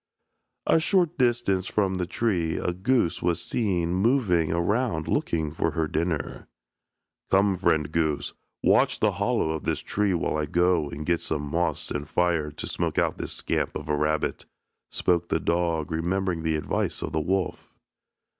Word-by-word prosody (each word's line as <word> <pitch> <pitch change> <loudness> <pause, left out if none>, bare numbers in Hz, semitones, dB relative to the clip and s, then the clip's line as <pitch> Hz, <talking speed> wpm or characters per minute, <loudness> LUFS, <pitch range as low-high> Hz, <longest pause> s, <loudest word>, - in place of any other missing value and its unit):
A - - +4
short 175 -2 +1
distance 120 -7 +2
from 100 -3 +1
the 90 -2 -2
tree 90 -6 0
a 90 - -1
goose 95 0 +1
was 85 -1 0
seen 90 -7 0
moving 95 - +2
around 85 0 0
looking 80 -2 0
for 80 0 -1
her 80 +1 0
dinner. 80 -2 -2 0.8
"Come, 95 0 +4
friend 80 -5 +1
goose, 80 -2 0 0.3
watch - - +3
the - - +3
hollow 80 - 0
of 80 - -4
this - - -1
tree 100 -3 0
while 80 - -1
I 75 -1 -1
go 85 -1 +2
and 75 +2 -6
get 85 0 +1
some 75 -2 -2
moss 85 +4 -1
and 75 0 -4
fire 85 -4 +1
to 75 - -6
smoke - - -2
out - - +1
this - - -3
scamp - - -1
of 75 0 -6
a 75 - +2
rabbit," 75 +1 -1 0.4
spoke 85 -1 +1
the 80 - +1
dog, 85 -3 0
remembering 90 +1 -1
the 80 -1 0
advice 75 - -2
of - - -3
the 80 - 0
wolf. 95 +4 -2
85 Hz, 165 wpm, -26 LUFS, 80-95 Hz, 0.8 s, A